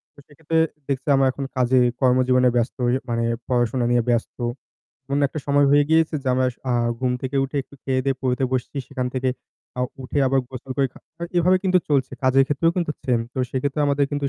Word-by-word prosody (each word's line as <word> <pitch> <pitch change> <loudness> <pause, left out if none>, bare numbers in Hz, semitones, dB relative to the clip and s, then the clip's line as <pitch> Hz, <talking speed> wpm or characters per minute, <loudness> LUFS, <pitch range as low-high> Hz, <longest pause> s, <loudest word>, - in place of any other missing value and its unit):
তো - - -17
সেক্ষেত্রে 160 +2 -2 0.3
দেখছি 135 0 -3
আমরা 135 0 +3
এখন 135 +1 -5
কাজে 130 0 +3 0.2
কর্মজীবনে 125 0 +4
ব্যস্ত 120 +2 0
হয়ে 125 +2 +2
মানে 115 0 0 0.2
পড়াশোনা 120 0 +1
নিয়ে 120 -1 +3
ব্যস্ত। 120 -1 -1 0.7
এমন 140 +1 0
একটা 155 - -6
সময় 145 0 +4
হয়ে 145 0 +5
গিয়েছে 160 -1 +3
যে - - -4
আমরা 130 -1 +1 0.5
ঘুম 125 -1 +1
থেকে 130 +1 -4
উঠে 140 +2 -3
একটু 140 - -18
খেয়ে 130 -1 0
দেয়ে 135 -1 0
পড়তে 130 0 0
বসছি 130 +3 -2
সেখান 130 -2 -3
থেকে 130 0 +1 0.5
আ - - 0 0.2
উঠে 140 +3 -2
আবার 135 0 +2
গোসল 130 0 -8
করে 135 -1 +3
খা - - -15 0.4
এভাবে 180 +2 +4
কিন্তু 185 -1 +3
চলছে। 135 -3 +1
কাজের 135 +1 +5
ক্ষেত্রেও 165 +3 +2
কিন্তু 170 -4 0
সেম 120 -3 +1
তো 130 - -4
সেক্ষেত্রে 140 +3 -2
আমাদের 140 0 +2
কিন্তু 145 -1 -1
135 Hz, 195 wpm, -22 LUFS, 125-145 Hz, 0.7 s, হয়ে